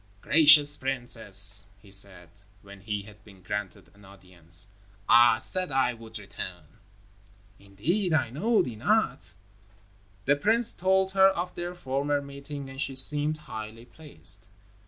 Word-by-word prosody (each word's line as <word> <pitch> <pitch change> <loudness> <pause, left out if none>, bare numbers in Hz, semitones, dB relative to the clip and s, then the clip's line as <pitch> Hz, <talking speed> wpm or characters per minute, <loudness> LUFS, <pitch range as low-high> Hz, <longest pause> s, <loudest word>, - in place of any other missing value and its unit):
"Gracious 145 -1 +6
princess," 110 -7 -4
he 100 -1 -18
said, 95 -3 -6 0.3
when 100 0 -13
he 105 0 -4
had 105 0 -16
been 95 -4 -17
granted 100 -1 -6
an 100 0 -20
audience. 90 -2 -3 0.4
"I 120 -1 +6
said 185 +10 -1
I 130 -2 +1
would 115 -1 -10
return." 95 -4 -8 1.0
"Indeed! 160 - -2
I 140 -7 +1
know 215 - +2
thee 120 -3 -6
not." 125 - 0 0.9
The 145 +2 +3
prince 225 +9 +4
told 190 +1 +1
her 190 0 +6
of 180 -1 -2
their 175 +1 -5
former 145 -2 -1
meeting 140 0 -8
and 135 +1 -7
she 135 -3 -2
seemed 150 +3 +3
highly 110 0 -8
pleased. 105 - -6
125 Hz, 135 wpm, -27 LUFS, 100-150 Hz, 1.0 s, Gracious